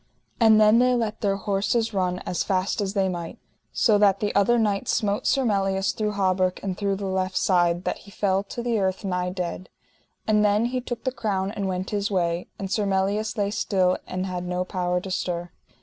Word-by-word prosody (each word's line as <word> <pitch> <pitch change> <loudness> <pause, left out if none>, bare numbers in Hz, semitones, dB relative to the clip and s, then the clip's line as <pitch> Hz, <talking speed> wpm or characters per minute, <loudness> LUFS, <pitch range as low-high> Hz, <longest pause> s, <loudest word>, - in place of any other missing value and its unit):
And 220 -2 +6
then 215 +2 +6
they 250 0 +4
let 220 -3 -2
their 200 -2 +1
horses 210 +3 0
run 180 -2 0
as 180 - -1
fast 190 +2 0
as 200 0 -3
they 195 -1 +2
might, 175 -2 -5 0.3
so 215 -3 +3
that 200 -2 +4
the 210 - -1
other 200 +4 +3
knight 210 -3 0
smote 205 -2 0
Sir 270 -1 +2
Melias 195 -2 +1
through 210 -1 -2
hauberk 185 -2 +1
and 190 -2 -2
through 200 0 -1
the 200 +1 -5
left 190 0 -1
side, 175 -2 +2
that - - -2
he - - -15
fell 195 -1 0
to 235 +4 -6
the 235 -2 0
earth 190 +1 -1
nigh 180 -1 -1
dead. 180 0 -5 0.6
And 210 -1 +3
then 210 +2 +3
he 250 +1 -1
took 240 -1 -6
the 260 - 0
crown 200 -6 -2
and 200 -2 -3
went 185 0 -3
his 205 -1 -1
way; 175 -3 -1
and 195 -1 -5
Sir 205 -1 0
Melias 200 +4 0
lay 200 -1 0
still 185 -4 +1
and 185 0 -3
had 180 -1 -4
no 180 0 -1
power 180 -1 -1
to 190 - -7
stir. 175 -1 -3
195 Hz, 210 wpm, -24 LUFS, 185-210 Hz, 0.6 s, And